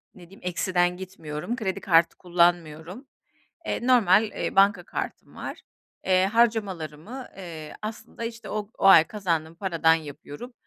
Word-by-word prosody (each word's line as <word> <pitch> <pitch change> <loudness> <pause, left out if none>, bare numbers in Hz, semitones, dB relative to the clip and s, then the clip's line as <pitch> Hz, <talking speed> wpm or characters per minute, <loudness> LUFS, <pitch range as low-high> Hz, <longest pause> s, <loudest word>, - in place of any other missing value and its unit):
ne 175 -2 -15
diyeyim 195 - -16
eksiden 180 0 0
gitmiyorum. 185 +2 -5
Kredi 200 -4 -3
kartı 165 -2 +4
kullanmıyorum. 175 - 0 0.6
Eee, 245 - -2
normal, 215 -5 +5
eee, 215 - -4
banka 195 -2 +4
kartım - - -6
var. - - -7 0.4
Eee, 185 0 +4
harcamalarımı, 210 - -1
eee, 160 -5 -8
aslında 220 +2 -7
işte 230 0 -7
o 210 -1 -4
o - - -1
ay 170 -5 +9
kazandığım 165 -6 -2
paradan 165 -3 +2
yapıyorum. 155 - -9
185 Hz, 135 wpm, -26 LUFS, 165-210 Hz, 0.6 s, ay